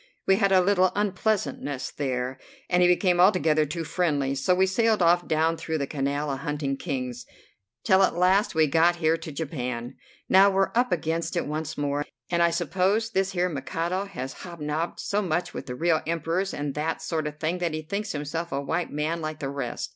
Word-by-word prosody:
We 190 - +4
had 195 -2 +2
a 190 -1 +6
little 185 -1 +3
unpleasantness 190 -9 -1
there, 130 -2 -3 0.3
and 180 0 +4
he 180 - +6
became 180 0 +3
altogether 160 -5 +4
too 165 +3 -4
friendly, 145 -5 0
so 140 +7 +2
we 190 +1 +4
sailed 220 +3 +2
off 175 0 +3
down 160 +1 +1
through 160 0 -3
the 140 - -1
Canal 140 +1 -2
a 135 - -2
hunting 145 -1 -2
Kings, 130 -5 -4 0.6
till 190 0 +4
at 190 - +3
last 185 +3 +3
we 160 0 +5
got 165 +4 +3
here 165 -1 +2
to 160 -1 -8
Japan. 125 -5 -4 0.3
Now 195 +1 +6
we're 195 0 +1
up 245 +2 +2
against 165 +1 -1
it - - 0
once 155 +1 -4
more, 145 0 -1 0.3
and 170 0 +2
I 170 - +5
suppose 185 +7 0
this 195 -2 0
here 180 0 +1
Mikado 170 +5 -2
has 135 -10 -6
hobnobbed 165 -1 -4
so 205 +1 -1
much 175 -2 -1
with 135 - -7
real 160 +6 +1
Emperors 170 +4 -1
and 145 -1 -3
that 155 +3 -2
sort 155 -3 -2
of 150 0 -7
thing 165 +3 -1
that 170 -3 -1
he 155 - -4
thinks 200 +6 -3
himself 155 +3 -4
a 140 - -1
white 165 +5 -2
man 155 +3 -2
like 155 -1 -4
the 140 -3 -4
rest. 140 -3 -4
165 Hz, 200 wpm, -26 LUFS, 145-180 Hz, 0.6 s, a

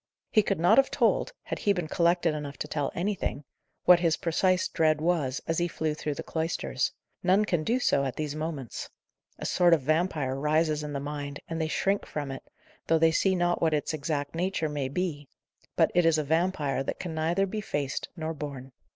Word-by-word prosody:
He 215 - +5
could 195 -4 -1
not 175 +9 +6
have 270 - +3
told - - +2
(had - - -4
he 200 - +3
been 175 -4 -3
collected 170 0 +2
enough 145 -2 -5
to - - -4
tell 145 -2 -2
anything) 180 -6 -2 0.4
what 180 -1 +8
his 170 -2 +2
precise 185 +2 +1
dread 155 -1 +2
was, 155 -5 0
as 165 +1 0
he 175 - +1
flew 160 -2 -2
through 150 -1 -3
the - - -5
cloisters. 160 +1 -1 0.3
None 190 +3 +3
can 175 -6 0
do 240 +9 +1
so, 140 - +2
at 135 -2 -2
these 150 -2 -3
moments. 155 -5 -5 0.5
A - - -6
sort 175 -2 +5
of 150 - -5
vampire 155 -3 +1
rises 150 +2 +1
in 150 -1 -5
the 140 - -2
mind, 145 0 -5
and 165 0 -3
they 160 - 0
shrink 195 +5 0
from 145 -3 -4
it, 135 - -6 0.5
though 165 - +4
they 160 0 +4
see 190 +4 +2
not 175 -1 +1
what 160 -2 +3
its 150 +1 -2
exact 145 -1 -2
nature 170 -2 -1
may 145 -3 -2
be; 150 -2 -3 0.5
but - - +3
it 175 - +4
is 165 -1 +4
a 155 - +1
vampire 155 -3 0
that 135 - -4
can 175 -3 -4
neither 165 +5 +1
be 215 +3 -4
faced 145 -8 -3
nor 160 0 -3
borne. 140 -3 -7
160 Hz, 210 wpm, -28 LUFS, 145-175 Hz, 0.5 s, what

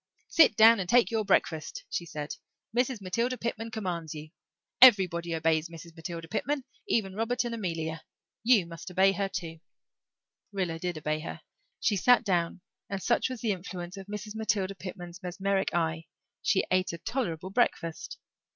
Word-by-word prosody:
"Sit 320 -9 +6
down 225 0 +8
and 180 -2 -3
take 235 -4 +5
your 220 -1 +1
breakfast," 195 - 0
she 170 - -3
said. 150 -2 -5 0.4
"Mrs. 245 -2 +1
Matilda 235 +7 -1
Pitman 230 -1 -3
commands 175 -8 -4
you. 155 0 -9 0.5
Everybody 180 -8 +6
obeys 160 0 +1
Mrs. 165 0 -11
Matilda 165 0 -6
Pitman 265 - -1 0.2
even 195 -4 +1
Robert 230 +4 0
and 240 -1 -3
Amelia. 165 -7 -3 0.4
You 225 -6 +5
must 170 +2 -9
obey 190 +2 +4
her 195 0 -1
too." 170 -4 -5 0.9
Rilla 180 -5 -2
did 175 -1 -3
obey 155 0 -1
her. 155 - -7 0.4
She 205 - +2
sat 245 +5 +5
down 175 -3 0 0.3
and, 195 -1 -4
such 240 - +2
was 255 -3 -6
the 225 - +1
influence 180 -1 -6
of 195 -1 -9
Mrs. 210 +1 -6
Matilda 205 -3 0
Pitman's 180 -1 -8
mesmeric 190 +2 -1
eye, 165 -1 -1 0.4
she 190 - +2
ate 185 0 +2
a - - -4
tolerable 185 -3 -3
breakfast. 170 -7 -1
190 Hz, 160 wpm, -29 LUFS, 170-220 Hz, 0.9 s, down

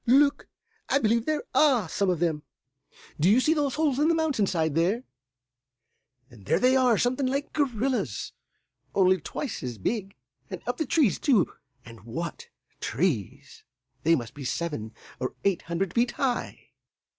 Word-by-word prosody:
Look! 280 +4 +4 0.4
I 270 - +4
believe 230 -2 +1
there 310 -1 0
are 260 - +4
some 195 +4 0
of 180 - +1
them. 160 -3 0 0.8
Do 165 +5 +4
you 220 +5 +6
see 310 +5 +3
those 290 -4 0
holes 295 -4 +1
in 300 - +3
the 335 - +3
mountain 300 -11 +1
side 160 -5 0
there? 185 - +1 1.3
And 105 -5 -16
there - - +3
they 255 +1 +4
are, 250 -4 +4
something 255 +2 +1
like 275 +2 -2
gorillas, 240 - -1 0.6
only 185 -2 +4
twice 270 - -5
as 125 -3 -5
big, 195 - -3 0.3
and - - -5
up - - -2
the 315 - -2
trees, 280 - +2
too 235 - +2 0.3
and 115 -1 -12
what 160 +9 -6 0.3
trees! 130 - -2 0.4
They 165 +1 +4
must 120 -5 -5
be 145 - -8
seven 125 -6 -3 0.2
or 130 - -3
eight 195 -3 +1
hundred 175 +1 -1
feet 240 +1 +1
high." 255 -3 -3
205 Hz, 160 wpm, -27 LUFS, 165-265 Hz, 1.3 s, you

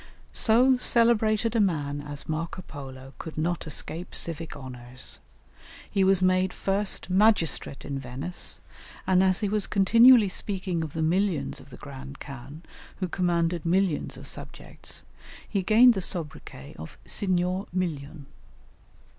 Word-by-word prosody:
So 250 +3 +4
celebrated 230 -2 +2
a - - +3
man 145 -7 0
as 145 -1 -6
Marco 165 +3 -4
Polo 135 -3 -10
could 160 - -8
not 165 +1 -1
escape 160 +3 -5
civic 165 -1 -4
honours. 130 -2 -6 0.7
He 195 - +2
was 190 -1 +3
made 185 0 +3
first 200 +1 0
magistrate 185 -8 +2
in 140 -1 -3
Venice, 135 +7 -1 0.5
and 185 -1 +4
as 185 +1 +2
he 210 - +1
was 205 0 -1
continually 230 +3 +6
speaking 185 -2 -3
of 155 -3 -5
the 160 - -1
"millions" 180 0 0
of - - -15
the 125 - -11
Grand 140 0 -10
Khan, 140 +3 -9 0.4
who 185 - -1
commanded 170 -2 0
"millions" 180 -1 0
of - - -11
subjects, - - -6 0.4
he 200 - -1
gained 225 +6 +6
the 195 - -3
soubriquet 150 - -5
of 80 - -9
Signor 185 0 -1
Million. 155 -5 -3
175 Hz, 140 wpm, -27 LUFS, 145-195 Hz, 0.7 s, continually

